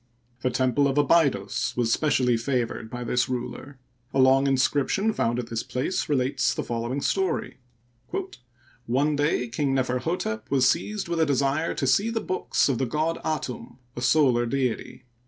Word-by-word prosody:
The 130 Hz, -, +1 dB
temple 130 Hz, +3 st, +2 dB
of 135 Hz, +1 st, -1 dB
Abydos 140 Hz, -, +2 dB
was 120 Hz, -1 st, +2 dB
specially 130 Hz, -5 st, +2 dB
favored 120 Hz, -2 st, -2 dB
by 120 Hz, +1 st, -5 dB
this 125 Hz, +2 st, 0 dB
ruler. 125 Hz, +2 st, -5 dB, 0.4 s
A -, -, +2 dB
long 135 Hz, +1 st, +5 dB
inscription 140 Hz, -, +1 dB
found 120 Hz, -, 0 dB
at 125 Hz, -2 st, -5 dB
this 115 Hz, 0 st, -1 dB
place 135 Hz, +8 st, -2 dB
relates 135 Hz, -2 st, +1 dB
the -, -, -2 dB
following 120 Hz, +4 st, -3 dB
story: 190 Hz, +3 st, -1 dB, 0.7 s
" 120 Hz, -1 st, -21 dB
One 140 Hz, +5 st, +1 dB
day 145 Hz, -4 st, +1 dB
King 135 Hz, +3 st, -1 dB
Neferhotep 125 Hz, -3 st, -2 dB
was 130 Hz, -2 st, +3 dB
seized 205 Hz, +7 st, -1 dB
with 170 Hz, -1 st, -2 dB
a 160 Hz, -, +4 dB
desire 140 Hz, +3 st, 0 dB
to 135 Hz, -, -1 dB
see 195 Hz, -, +3 dB
the 230 Hz, 0 st, -1 dB
books 185 Hz, -3 st, 0 dB
of 135 Hz, -4 st, 0 dB
the 130 Hz, -, 0 dB
god 155 Hz, +6 st, -1 dB
Atum, 150 Hz, -7 st, -4 dB, 0.2 s
a 125 Hz, -, -5 dB
solar 125 Hz, -3 st, +3 dB
deity. 130 Hz, -1 st, -2 dB
130 Hz, 165 wpm, -25 LUFS, 120-145 Hz, 0.7 s, long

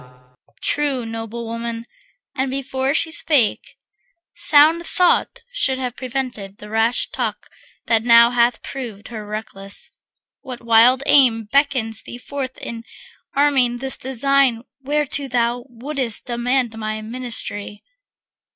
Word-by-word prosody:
True, 280 Hz, -5 st, 0 dB
noble 225 Hz, +1 st, -6 dB
women, 230 Hz, 0 st, -5 dB, 0.5 s
and 265 Hz, +1 st, -1 dB
before 265 Hz, 0 st, -2 dB
she 330 Hz, 0 st, +1 dB
spake 290 Hz, -8 st, +1 dB, 0.6 s
Sound 330 Hz, 0 st, +4 dB
thought 365 Hz, +6 st, +2 dB
should 275 Hz, -, +1 dB
have 250 Hz, -2 st, -4 dB
prevented 245 Hz, -6 st, -5 dB
the 210 Hz, 0 st, -11 dB
rash 225 Hz, +2 st, +1 dB
talk -, -, -3 dB, 0.4 s
That 225 Hz, -2 st, +2 dB
now 235 Hz, 0 st, +6 dB
hath 240 Hz, -1 st, +2 dB
proved 230 Hz, -7 st, -7 dB
her 220 Hz, -3 st, -7 dB
reckless. 205 Hz, -2 st, -3 dB, 0.5 s
What 255 Hz, -4 st, -8 dB
wild 235 Hz, +3 st, +5 dB
aim 250 Hz, -6 st, +5 dB
Beckons 255 Hz, -2 st, 0 dB
thee 240 Hz, -, -9 dB
forth 260 Hz, +1 st, -6 dB
in 230 Hz, -1 st, -7 dB, 0.5 s
arming 270 Hz, -4 st, +3 dB
this 265 Hz, +1 st, +2 dB
design 265 Hz, -2 st, +1 dB, 0.2 s
Whereto 285 Hz, 0 st, -1 dB
thou 240 Hz, -1 st, -1 dB
wouldst 250 Hz, -1 st, -1 dB
demand 245 Hz, -1 st, 0 dB
my 215 Hz, 0 st, -4 dB
ministry? 220 Hz, -3 st, -5 dB
245 Hz, 120 wpm, -20 LUFS, 225-275 Hz, 0.6 s, now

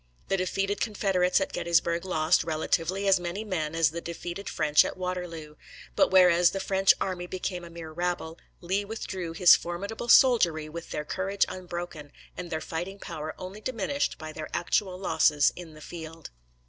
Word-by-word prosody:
The 195 Hz, -, +2 dB
defeated 195 Hz, +2 st, -1 dB
Confederates 195 Hz, -4 st, +1 dB
at -, -, -3 dB
Gettysburg 170 Hz, 0 st, +1 dB
lost, 160 Hz, -1 st, +2 dB
relatively, 165 Hz, +4 st, -1 dB
as 195 Hz, -2 st, +5 dB
many 175 Hz, +4 st, -4 dB
men 165 Hz, -7 st, -3 dB
as 165 Hz, -2 st, +3 dB
the 170 Hz, +1 st, -5 dB
defeated 175 Hz, +3 st, -6 dB
French 150 Hz, 0 st, +4 dB
at -, -, -5 dB
Waterloo; 175 Hz, -4 st, -5 dB, 0.4 s
but -, -, +4 dB
whereas 180 Hz, -2 st, +6 dB
the 195 Hz, -, -4 dB
French 195 Hz, 0 st, +3 dB
army 180 Hz, -2 st, -3 dB
became 180 Hz, -1 st, -4 dB
a 170 Hz, -, -9 dB
mere 165 Hz, -1 st, -9 dB
rabble, 175 Hz, -1 st, -3 dB, 0.2 s
Lee 190 Hz, +3 st, -1 dB
withdrew 190 Hz, -5 st, -5 dB
his 175 Hz, +1 st, +7 dB
formidable 200 Hz, +7 st, -5 dB
soldiery 175 Hz, -, +5 dB
with 165 Hz, +2 st, -8 dB
their 150 Hz, -, -4 dB
courage 195 Hz, +4 st, 0 dB
unbroken, 175 Hz, -5 st, -7 dB, 0.2 s
and 175 Hz, -1 st, -6 dB
their 160 Hz, -, -2 dB
fighting 175 Hz, +4 st, -5 dB
power 155 Hz, -5 st, -6 dB
only 190 Hz, +3 st, -8 dB
diminished 255 Hz, +5 st, -2 dB
by 155 Hz, -1 st, -7 dB
their 155 Hz, 0 st, -6 dB
actual 185 Hz, +1 st, 0 dB
losses 160 Hz, -5 st, +3 dB
in 165 Hz, -3 st, -10 dB
the 155 Hz, -, -13 dB
field. 165 Hz, 0 st, -9 dB
175 Hz, 170 wpm, -27 LUFS, 165-190 Hz, 0.4 s, his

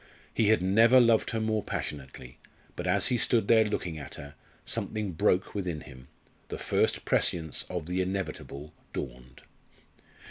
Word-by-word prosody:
He 110 Hz, -, +2 dB
had 110 Hz, -4 st, +3 dB
never 115 Hz, +7 st, +6 dB
loved 115 Hz, -2 st, +4 dB
her 115 Hz, -, -2 dB
more 110 Hz, -1 st, 0 dB
passionately 65 Hz, -7 st, -6 dB, 0.4 s
but 90 Hz, -, -4 dB
as 95 Hz, +4 st, +3 dB
he 125 Hz, -, +2 dB
stood 115 Hz, -2 st, +2 dB
there 115 Hz, -1 st, +6 dB
looking 90 Hz, -6 st, -3 dB
at 70 Hz, -, -9 dB
her, 70 Hz, 0 st, -10 dB, 0.3 s
something 110 Hz, -3 st, -2 dB
broke 90 Hz, +3 st, +1 dB
within 90 Hz, -6 st, -3 dB
him, 65 Hz, 0 st, -13 dB, 0.4 s
the -, -, -5 dB
first -, -, 0 dB
prescience 80 Hz, -3 st, +2 dB
of 90 Hz, -4 st, -4 dB
the 90 Hz, +2 st, -1 dB
inevitable 90 Hz, -6 st, -5 dB, 0.2 s
dawned. 65 Hz, 0 st, -7 dB
90 Hz, 150 wpm, -28 LUFS, 75-110 Hz, 0.4 s, never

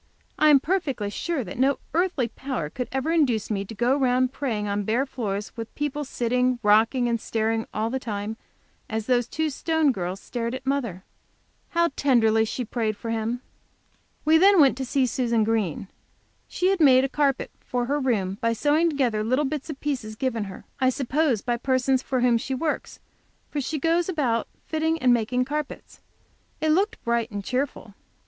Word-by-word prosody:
I 305 Hz, -, +6 dB
am 285 Hz, -2 st, +7 dB
perfectly 275 Hz, -, -1 dB
sure 325 Hz, +3 st, -2 dB
that 190 Hz, +3 st, -8 dB
no 270 Hz, +1 st, +3 dB, 0.2 s
earthly 340 Hz, -7 st, +1 dB
power 235 Hz, -, -4 dB
could 250 Hz, -, -4 dB
ever 265 Hz, +4 st, -1 dB
induce 255 Hz, -11 st, +1 dB
me 200 Hz, -2 st, -1 dB
to 225 Hz, -, -9 dB
go 240 Hz, +5 st, +2 dB
round 255 Hz, -1 st, +2 dB
praying 225 Hz, -8 st, -2 dB
on 205 Hz, 0 st, -1 dB
bare 225 Hz, +6 st, +1 dB
floors, 210 Hz, -6 st, -4 dB
with 230 Hz, -1 st, -7 dB
people 295 Hz, 0 st, -2 dB
sitting, 250 Hz, -1 st, 0 dB
rocking 225 Hz, +4 st, +4 dB
and 230 Hz, -1 st, 0 dB
staring 225 Hz, 0 st, -1 dB
all 220 Hz, +2 st, -2 dB
the 265 Hz, -, -1 dB
time, 210 Hz, -2 st, -4 dB, 0.5 s
as 220 Hz, -1 st, -2 dB
the 245 Hz, 0 st, +3 dB
two 310 Hz, +6 st, -2 dB
Stone 320 Hz, 0 st, +1 dB
girls 185 Hz, -3 st, -4 dB
stared 235 Hz, +3 st, -4 dB
at 260 Hz, -, -8 dB
mother. 240 Hz, -10 st, -2 dB, 0.7 s
How 340 Hz, 0 st, +2 dB
tenderly 225 Hz, -5 st, +3 dB
she 245 Hz, +3 st, -3 dB
prayed 220 Hz, -2 st, -2 dB
for 230 Hz, -, -5 dB
him! 230 Hz, +2 st, -2 dB, 0.8 s
We 320 Hz, +1 st, +5 dB
then 390 Hz, +1 st, +6 dB
went 275 Hz, -5 st, +6 dB
to 265 Hz, -, -2 dB
see 265 Hz, +1 st, +1 dB
Susan 235 Hz, -3 st, +1 dB
Green. 210 Hz, -5 st, -1 dB, 0.6 s
She 365 Hz, -, 0 dB
had 390 Hz, -1 st, +1 dB
made 265 Hz, -4 st, +6 dB
a -, -, +2 dB
carpet 275 Hz, -1 st, 0 dB
for 245 Hz, -1 st, -2 dB
her 285 Hz, +4 st, 0 dB
room 205 Hz, -7 st, -1 dB
by 230 Hz, 0 st, +2 dB
sewing 300 Hz, +7 st, +2 dB
together 250 Hz, -8 st, 0 dB
little 255 Hz, +7 st, +1 dB
bits 290 Hz, +2 st, -4 dB
of 285 Hz, -3 st, -6 dB
pieces 250 Hz, -7 st, -3 dB
given 230 Hz, -3 st, -1 dB
her, 190 Hz, -1 st, -10 dB
I 260 Hz, -, +4 dB
suppose, 265 Hz, -2 st, 0 dB
by 240 Hz, -1 st, 0 dB
persons 260 Hz, +1 st, +1 dB
for 260 Hz, -2 st, -1 dB
whom 240 Hz, -2 st, +4 dB
she 265 Hz, +2 st, -3 dB
works, 305 Hz, +3 st, -3 dB, 0.5 s
for 290 Hz, -, -1 dB
she 305 Hz, +4 st, -3 dB
goes 335 Hz, +4 st, +1 dB
about 255 Hz, -10 st, 0 dB, 0.2 s
fitting 320 Hz, +1 st, 0 dB
and 255 Hz, -5 st, +4 dB
making 245 Hz, +2 st, +1 dB
carpets. 300 Hz, +1 st, -5 dB, 0.6 s
It 315 Hz, -, 0 dB
looked 385 Hz, +7 st, +1 dB
bright 235 Hz, -1 st, 0 dB
and 205 Hz, -1 st, -5 dB
cheerful. 255 Hz, -3 st, -3 dB
255 Hz, 185 wpm, -25 LUFS, 225-285 Hz, 0.8 s, am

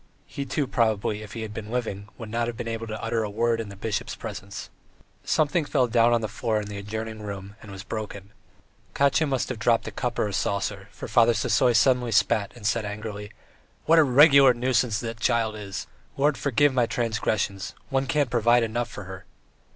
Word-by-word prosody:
He, 140 Hz, -, -5 dB
too, 140 Hz, +2 st, -1 dB
probably, 110 Hz, -4 st, 0 dB
if 105 Hz, -3 st, -10 dB
he 115 Hz, -, -5 dB
had 105 Hz, -1 st, -6 dB
been 105 Hz, 0 st, -7 dB
living, 110 Hz, -4 st, -3 dB
would 110 Hz, -2 st, -8 dB
not 115 Hz, +1 st, 0 dB
have 120 Hz, -1 st, -5 dB
been -, -, -5 dB
able 115 Hz, 0 st, -4 dB
to 110 Hz, 0 st, -5 dB
utter 115 Hz, 0 st, 0 dB
a 105 Hz, -, -2 dB
word 115 Hz, +2 st, 0 dB
in 110 Hz, -, -7 dB
the 100 Hz, -, -9 dB
bishop's 100 Hz, +2 st, -3 dB
presence.... 100 Hz, +1 st, -7 dB, 0.5 s
Something 155 Hz, +2 st, +1 dB
fell 145 Hz, -3 st, +2 dB
down 120 Hz, 0 st, +3 dB
on 120 Hz, -1 st, +3 dB
the 110 Hz, -, -2 dB
floor 110 Hz, +1 st, -1 dB
in 105 Hz, -, -5 dB
the 100 Hz, -1 st, -6 dB
adjoining 110 Hz, +2 st, -5 dB
room 100 Hz, -1 st, -7 dB
and 105 Hz, -, -12 dB
was 95 Hz, -1 st, -8 dB
broken; 100 Hz, -2 st, -6 dB, 0.6 s
Katya 140 Hz, +3 st, +3 dB
must 135 Hz, -2 st, -1 dB
have 125 Hz, -4 st, -4 dB
dropped 115 Hz, 0 st, +2 dB
a -, -, -4 dB
cup 120 Hz, +3 st, -3 dB
or -, -, +1 dB
a 100 Hz, -, -5 dB
saucer, 100 Hz, 0 st, -2 dB
for -, -, -8 dB
Father 120 Hz, -1 st, +4 dB
Sisoy 125 Hz, -, +2 dB
suddenly 125 Hz, 0 st, +3 dB
spat 105 Hz, -1 st, +2 dB
and 115 Hz, -4 st, -11 dB
said 115 Hz, +1 st, +1 dB
angrily: 105 Hz, 0 st, -6 dB, 0.6 s
"What 165 Hz, +1 st, +6 dB
a -, -, +7 dB
regular 140 Hz, -1 st, +7 dB
nuisance 120 Hz, -2 st, +1 dB
the 115 Hz, -1 st, -4 dB
child 110 Hz, 0 st, 0 dB
is! 100 Hz, -2 st, -6 dB, 0.3 s
Lord 145 Hz, +2 st, +3 dB
forgive 145 Hz, +1 st, +2 dB
my 125 Hz, -2 st, +2 dB
transgressions! 110 Hz, -3 st, -2 dB
One 135 Hz, 0 st, 0 dB
can't 140 Hz, -2 st, +1 dB
provide 120 Hz, 0 st, +4 dB
enough 115 Hz, 0 st, -2 dB
for 105 Hz, -, -8 dB
her." 95 Hz, 0 st, -9 dB
115 Hz, 205 wpm, -25 LUFS, 105-125 Hz, 0.6 s, a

